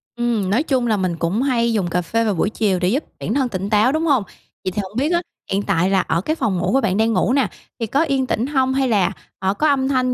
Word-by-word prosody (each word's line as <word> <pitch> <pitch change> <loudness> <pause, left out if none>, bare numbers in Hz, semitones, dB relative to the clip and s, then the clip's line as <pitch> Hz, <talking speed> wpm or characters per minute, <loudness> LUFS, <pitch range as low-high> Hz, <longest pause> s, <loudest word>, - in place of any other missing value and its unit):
Ừm, 235 -5 0
nói 225 +9 +2
chung 260 -5 0
là 215 -2 +2
mình 185 -3 -1
cũng 170 +8 0
hay 235 -4 +1
dùng 200 -5 0
cà 180 +1 0
phê 230 +7 0
vào 210 - +1
buổi 190 +3 0
chiều 205 -4 0
để 180 - +1
giúp 265 +11 +1 0.2
bản - - -2
thân 265 -1 +1
tỉnh 195 -1 -3
táo, 215 +4 +4
đúng 315 +3 0
hông? 275 -8 +3 0.4
Vậy 185 - -1
thì 205 - -2
hổng 195 +2 -10
biết 285 +6 +1
á, 345 - +2 0.3
hiện 195 +1 +1
tại 175 +1 +1
là 195 -1 +3
ở 165 +2 -1
cái 310 +11 -1
phòng 220 - -1
ngủ 175 - 0
của 270 - +3
bạn 195 -5 0
đang 225 +1 +2
ngủ 245 - +2
nà, 275 -1 +2 0.3
thì 225 - -2
có 280 +8 +2
yên 275 -5 0
tĩnh 245 0 -1
hông 265 -2 +1
hay 265 0 +1
là, 200 -6 +2 0.3
ờ, 190 0 0
có 305 +9 +1
âm 270 -2 +2
thanh 255 -2 +1
230 Hz, 290 wpm, -20 LUFS, 195-265 Hz, 0.4 s, táo